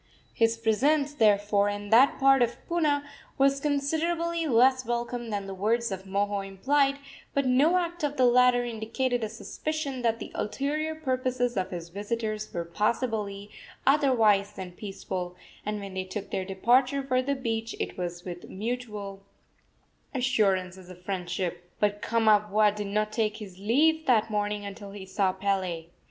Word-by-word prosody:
His 225 0 +2
presence, 280 +7 +2
therefore, 205 -4 +3
in 205 0 -5
that 250 +5 +6
part 270 -1 +5
of 240 0 +1
Puna, 300 -4 +1 0.3
was 275 0 +3
considerably 320 +4 0
less 260 +1 +4
welcome 240 0 -3
than 205 -2 -3
the 195 - -6
words 225 +4 0
of 190 0 -5
Moho 200 +1 0
implied; 275 +9 +1 0.4
but 280 -1 +2
no 280 +8 +4
act 345 -2 -2
of 290 0 -1
the 255 - +5
latter 245 0 +5
indicated 240 +2 -2
a 215 - -2
suspicion 280 +4 -4
that 230 -1 +1
the - - -8
ulterior 290 +8 -2
purposes 255 -4 -1
of 190 -2 -1
his 170 -2 -6
visitors 215 +2 -3
were 170 -1 -3
possibly 210 +1 -2 0.3
otherwise 230 -9 +4
than 185 -2 -7
peaceful, 185 -2 -5 0.3
and 210 0 -3
when 200 -1 -7
they 190 0 -2
took 190 +2 -6
their 190 - -2
departure 250 +8 +2
for 255 -1 +1
the 280 +2 -1
beach 230 -3 -3
it - - -3
was 175 -1 -5
with 175 -1 -7
mutual 210 -2 -5 0.9
assurances 190 -8 0
of 180 -1 -11
friendship. 180 -2 -3
But 205 0 +1
Kamapuaa 210 -2 +3
did 210 -1 -4
not 210 +1 0
take 215 -1 0
his 195 -4 -10
leave 310 +10 +2
that 225 -3 +3
morning 205 0 -1
until 200 0 -8
he 200 -2 -8
saw 190 0 +1
Pele. 185 -4 -2
220 Hz, 155 wpm, -28 LUFS, 200-260 Hz, 0.9 s, that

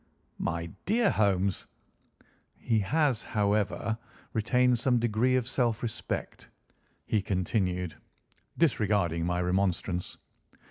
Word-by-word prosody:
"My 85 0 -2 0.2
dear 220 +1 +3
Holmes!" 95 -2 +1 0.9
"He 115 -2 +1
has, 135 +3 +1
however, 105 +1 0 0.3
retained 125 +2 +3
some 125 +1 +3
degree 120 +2 +2
of 125 -2 0
self 120 -4 0
respect," 115 -2 -4 0.6
he 105 - +1
continued, 90 -2 -1 0.6
disregarding 100 - +2
my 90 0 0
remonstrance. 90 -1 -1
105 Hz, 95 wpm, -29 LUFS, 95-120 Hz, 0.9 s, dear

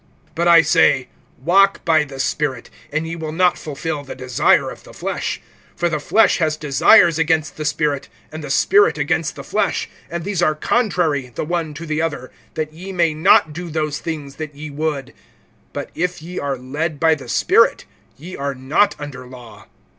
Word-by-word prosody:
(16)But 170 +1 +1
I 170 -1 +8
say, 160 -7 +3 0.3
walk 195 +5 +3
by 160 -2 +4
the 135 -2 -10
Spirit, 135 -2 -2 0.2
and 155 +2 -1
ye 165 - -4
will 160 -2 -5
not 180 +2 +3
fulfill 150 0 -5
the 135 - -8
desire 130 -2 +2
of - - -11
the - - -14
flesh. - - -3 0.4
(17)For 175 -1 0
the 155 - -1
flesh 225 +9 +3
has 155 -2 0
desires 165 +4 +5
against 160 -1 +1
the 155 - -5
Spirit, 145 -2 -1 0.2
and 155 0 -7
the 145 - -6
Spirit 415 - +4
against - - -1
the - - -8
flesh; - - -1 0.2
and 170 0 -4
these 195 -2 -2
are 155 -3 +2
contrary 160 - 0
the - - -3
one 165 -2 -2
to 165 +3 -7
the 155 0 -1
other, 150 -6 -3 0.2
that 155 -1 -3
ye 185 +4 -8
may 170 -4 +1
not 160 -1 +4
do 175 +2 -6
those 150 -2 -2
things 150 -4 -6
that 155 -2 -6
ye 150 +1 -8
would. 145 -2 -3 0.6
(18)But - - -4
if 180 +1 -2
ye 175 +3 -7
are 140 -2 -2
led 145 +4 -4
by 160 +1 +4
the 140 -6 -7
Spirit, - - +3 0.3
ye 175 +6 -9
are 140 0 -3
not 140 +11 +1
under 135 -4 -8
law. 125 -2 -13
155 Hz, 190 wpm, -20 LUFS, 145-170 Hz, 0.6 s, I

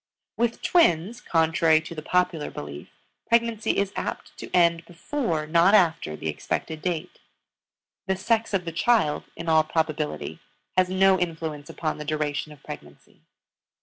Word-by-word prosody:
With 235 +1 -1
twins, 235 - +3
contrary 160 -1 +3
to 160 - -8
the 155 - -6
popular 180 -2 0
belief, 75 0 -8 0.4
pregnancy 230 -2 +1
is 200 -1 0
apt - - -5
to - - -7
end 170 -1 +3
before, 170 - -2
not 170 +6 +5
after, 165 - +2
the 80 - -6
expected 155 - -3
date. 175 -2 -3 0.9
The 190 - +1
sex 225 +4 0
of 180 -2 -1
the 165 - -3
child, 175 -3 +2
in 165 - -7
all 160 -1 +5
probability, 155 -1 -2 0.4
has 185 -1 +3
no 190 0 +4
influence 160 -4 -4
upon 155 -2 -3
the 150 - -6
duration 150 0 -2
of 150 -2 -15
pregnancy. 75 - -11
165 Hz, 150 wpm, -25 LUFS, 155-190 Hz, 0.9 s, not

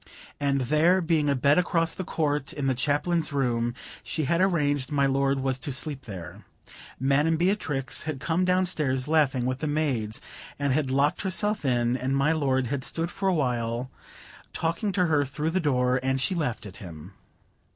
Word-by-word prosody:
And 140 -1 +1
there 155 +8 +3
being 160 -4 +1
a 140 - +2
bed 140 +5 +4
across 165 -2 +1
the 185 - -4
court 145 -4 -1
in 145 -2 -3
the 135 - +2
Chaplain's 150 +5 0
room, 120 -4 0 0.3
she 155 - -3
had 170 +5 +1
arranged 145 -8 +1
my 140 -1 +2
lord 135 0 +1
was 130 -1 -1
to 145 - -2
sleep 135 +1 -2
there. 90 -7 -8 0.6
Madam 145 +5 +2
Beatrix 160 - 0
had 155 -3 -4
come 165 +6 0
down 185 0 +2
stairs 135 -7 0
laughing 145 -5 +2
with 130 +1 -1
the 155 - -2
maids, 135 -8 -1 0.4
and 140 -2 0
had 140 -1 0
locked 140 +3 +1
herself 205 +1 0
in, 120 -1 +2
and 130 +1 -1
my 140 +3 +3
lord 135 -5 +1
had 130 +2 -3
stood 165 +5 -1
for 195 -1 -1
a - - +2
while 125 -3 -1 0.6
talking 165 +5 -1
to 180 -1 +2
her 150 -3 +2
through 150 +3 -3
the 185 - +1
door, 125 -5 +2
and 130 +1 0
she 185 - 0
laughing 125 - -2
at 95 - -13
him. 85 -2 -10
140 Hz, 185 wpm, -26 LUFS, 130-160 Hz, 0.6 s, bed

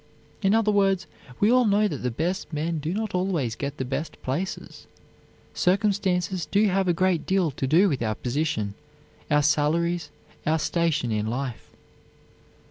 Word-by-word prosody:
In 195 +1 +3
other 220 -2 +3
words, 195 -3 +2 0.3
we 210 +3 +4
all 250 0 +5
know 210 0 +3
that 150 - -3
the 125 - -2
best 165 +12 -2
men 160 +1 -2
do 155 +3 -3
not 215 +2 -2
always 175 -11 0
get 140 +3 -4
the 130 - -2
best 135 +5 -4
places; 170 +10 -4 0.7
circumstances 185 -3 +1
do 205 +7 +3
have 190 0 +1
a - - +4
great 175 -1 +1
deal 185 -5 +2
to 135 - -3
do 170 +9 +5
with 140 -9 -1
our 110 -2 0
position, 125 -6 -2 0.6
our 150 0 +3
salaries, 165 +4 +1 0.3
our 155 +1 +2
station 160 -6 0
in 105 0 -1
life. 125 0 -4
170 Hz, 160 wpm, -25 LUFS, 140-190 Hz, 0.7 s, all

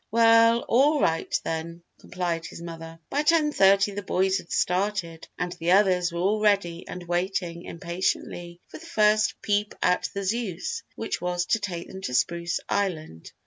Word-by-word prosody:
"Well, 230 +1 +5
all 285 +5 +4
right, 165 -10 0
then," 165 +1 -5 0.2
complied 170 -3 -3
his - - -10
mother. 165 -1 -8
By 285 - +1
ten 305 -1 +3
thirty 200 -4 +4
the 205 +1 -5
boys 190 0 +1
had 175 - -13
started 180 -3 -1
and 180 0 -2
the 175 +1 +1
others 185 -3 +3
were 170 - -4
all 205 +4 +1
ready 195 -5 +1
and 180 - -7
waiting 175 -1 -2
impatiently 175 0 -3
for - - -11
the 335 - -13
first 215 -7 +3
peep 205 0 0
at 180 - +1
the 200 - -4
Zeus 230 - -2
which - - -4
was 175 0 -1
to 225 - +1
take 175 -4 -5
them 190 - -9
to 125 -9 -3
Spruce 170 +5 0
Island. 160 - -3
185 Hz, 170 wpm, -26 LUFS, 170-210 Hz, 0.2 s, Well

